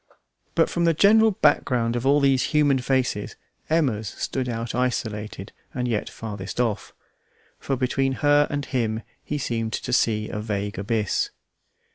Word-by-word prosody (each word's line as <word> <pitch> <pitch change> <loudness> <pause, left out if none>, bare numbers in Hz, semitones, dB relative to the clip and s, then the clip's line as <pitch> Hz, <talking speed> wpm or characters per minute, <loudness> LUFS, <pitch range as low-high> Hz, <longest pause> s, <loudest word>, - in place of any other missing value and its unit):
But - - +4
from 170 0 0
the 165 -1 +3
general 220 +5 +6
background 125 - +2
of 120 +2 -1
all 145 +1 +5
these 135 -2 +3
human 145 -3 +4
faces 125 -5 -1 0.3
Emma's 130 -10 +1
stood 125 +5 -3
out 115 0 -3
isolated 110 -5 -2 0.2
and 125 -1 -1
yet 110 -3 -1
farthest 105 -2 -7
off; 115 -4 -1 0.7
for 135 - -1
between 135 +1 0
her 145 0 +5
and 145 -1 -2
him 115 -4 -1 0.2
he 150 - -3
seemed 115 -5 -2
to 125 - -3
see 110 -3 +2
a 105 - -4
vague 105 -2 -3
abyss. 105 0 0
125 Hz, 150 wpm, -24 LUFS, 110-140 Hz, 0.7 s, general